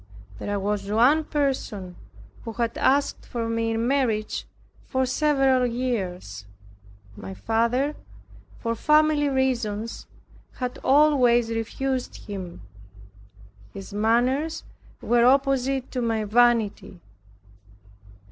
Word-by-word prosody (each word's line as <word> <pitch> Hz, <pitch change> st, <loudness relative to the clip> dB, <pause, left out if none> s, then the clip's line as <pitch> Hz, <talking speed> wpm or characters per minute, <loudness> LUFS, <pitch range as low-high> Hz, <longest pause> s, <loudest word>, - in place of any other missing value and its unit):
There 205 Hz, 0 st, -2 dB
was 200 Hz, 0 st, -2 dB
one 255 Hz, +9 st, +4 dB
person 250 Hz, -, -2 dB, 0.5 s
who 225 Hz, -, -6 dB
had 235 Hz, 0 st, -2 dB
asked 280 Hz, +2 st, +1 dB
for 230 Hz, -2 st, -4 dB
me 230 Hz, 0 st, -1 dB
in 225 Hz, +1 st, -1 dB
marriage 245 Hz, -6 st, -1 dB, 0.4 s
for 260 Hz, -1 st, -1 dB
several 270 Hz, -2 st, +2 dB
years. 185 Hz, -, -4 dB, 0.7 s
My 95 Hz, -1 st, -8 dB
father, 235 Hz, -, 0 dB, 0.6 s
for 230 Hz, -1 st, -2 dB
family 300 Hz, +3 st, +3 dB
reasons, 235 Hz, -5 st, -2 dB, 0.5 s
had 250 Hz, -1 st, -5 dB
always 255 Hz, -5 st, +4 dB
refused 255 Hz, +3 st, -3 dB
him. 185 Hz, -, -7 dB, 1.1 s
His 195 Hz, 0 st, -9 dB
manners 245 Hz, +9 st, +1 dB, 0.4 s
were 240 Hz, 0 st, +3 dB
opposite 270 Hz, 0 st, +2 dB
to 255 Hz, -, -2 dB
my 225 Hz, -2 st, 0 dB
vanity. 225 Hz, -, +1 dB
240 Hz, 100 wpm, -24 LUFS, 220-270 Hz, 1.1 s, one